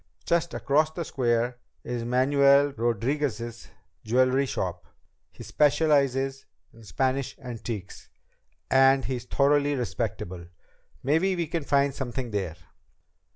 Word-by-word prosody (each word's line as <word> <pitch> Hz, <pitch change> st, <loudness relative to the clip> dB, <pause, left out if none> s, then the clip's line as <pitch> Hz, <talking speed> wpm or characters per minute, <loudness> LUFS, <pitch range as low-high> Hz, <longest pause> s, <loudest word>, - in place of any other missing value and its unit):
Just 170 Hz, -1 st, 0 dB
across 155 Hz, +3 st, +2 dB
the 165 Hz, +1 st, -5 dB
square 120 Hz, -2 st, 0 dB, 0.2 s
is 120 Hz, -1 st, -4 dB
Manuel 140 Hz, +3 st, +4 dB
Rodriguez's 120 Hz, 0 st, -2 dB, 0.4 s
jewelry 130 Hz, +4 st, +2 dB
shop. 90 Hz, -6 st, -4 dB, 0.4 s
He -, -, -11 dB
specializes 140 Hz, -3 st, +1 dB, 0.3 s
in 115 Hz, -, -16 dB
Spanish 130 Hz, +4 st, -1 dB
antiques, 115 Hz, -6 st, -7 dB, 0.6 s
and 135 Hz, 0 st, +5 dB
he's 125 Hz, -2 st, -4 dB
thoroughly 145 Hz, +2 st, +2 dB
respectable. 95 Hz, -7 st, -4 dB, 0.6 s
Maybe 165 Hz, +8 st, +2 dB
we 170 Hz, -1 st, -1 dB
can 165 Hz, 0 st, -3 dB
find 140 Hz, 0 st, +2 dB
something 130 Hz, -2 st, -4 dB
there." 95 Hz, -6 st, -3 dB
130 Hz, 110 wpm, -26 LUFS, 120-140 Hz, 0.6 s, and